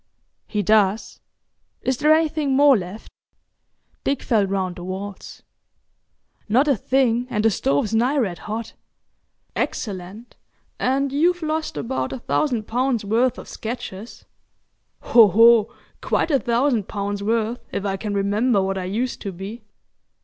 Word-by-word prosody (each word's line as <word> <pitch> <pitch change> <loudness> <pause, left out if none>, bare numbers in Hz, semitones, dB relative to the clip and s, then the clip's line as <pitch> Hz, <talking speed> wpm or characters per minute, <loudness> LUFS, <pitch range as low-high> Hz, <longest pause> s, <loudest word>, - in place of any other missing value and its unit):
"He 210 -1 -2
does. 210 +1 +2 0.6
Is 260 -1 0
there 300 +1 +4
anything 310 -3 +2
more 285 0 +6
left?" 195 +1 -5 1.0
Dick 275 - -1
felt 210 -5 +1
round 190 -2 -2
the 175 - -8
walls. 190 +2 -7 1.1
"Not 255 +7 +3
a 280 - +4
thing, 245 +1 +1
and 215 -3 -1
the 225 - +5
stove's 145 +4 0
nigh 245 +6 +2
red 195 -10 -1
hot." 220 +1 -4 0.8
"Excellent, 200 +2 -5 0.4
and 270 +2 0
you've 345 +4 +2
lost 315 0 -2
about 260 +3 -3
a - - -4
thousand 245 -2 -1
pounds' 245 -1 -1
worth 230 +4 +1
of - - -10
sketches. 220 -2 -7 0.8
Ho! 230 -3 +6
ho! 225 +2 +5 0.3
Quite - - 0
a 275 - +3
thousand 240 -3 +1
pounds' 200 0 -3
worth, 225 +2 0
if 200 - -3
I 195 -1 -1
can 205 +1 -4
remember 205 +3 +1
what 195 0 -1
I 185 - -4
used 230 +7 -3
to 200 - -4
be." 195 +6 -8
225 Hz, 140 wpm, -22 LUFS, 200-260 Hz, 1.1 s, more